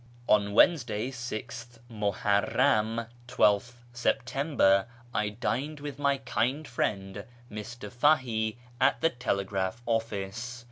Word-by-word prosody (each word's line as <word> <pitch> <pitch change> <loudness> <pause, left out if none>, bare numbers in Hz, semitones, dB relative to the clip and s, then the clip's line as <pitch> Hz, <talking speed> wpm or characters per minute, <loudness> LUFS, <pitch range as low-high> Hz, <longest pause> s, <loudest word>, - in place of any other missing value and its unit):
On 100 -1 +3
Wednesday, 120 - +3
6th 120 -1 -6
Muharram 105 +1 +1 0.2
(12th 120 -1 +2 0.2
September), 125 -5 +2 0.3
I 105 0 0
dined 130 +7 -3
with 145 -1 -7
my 140 -1 +2
kind 135 +3 -1
friend 100 -4 -2 0.3
Mr. 115 +4 -7
Fahie 120 -5 +2 0.2
at - - +3
the 165 - +3
telegraph 100 -2 -2
office. 115 +1 -3
115 Hz, 100 wpm, -29 LUFS, 105-125 Hz, 0.3 s, On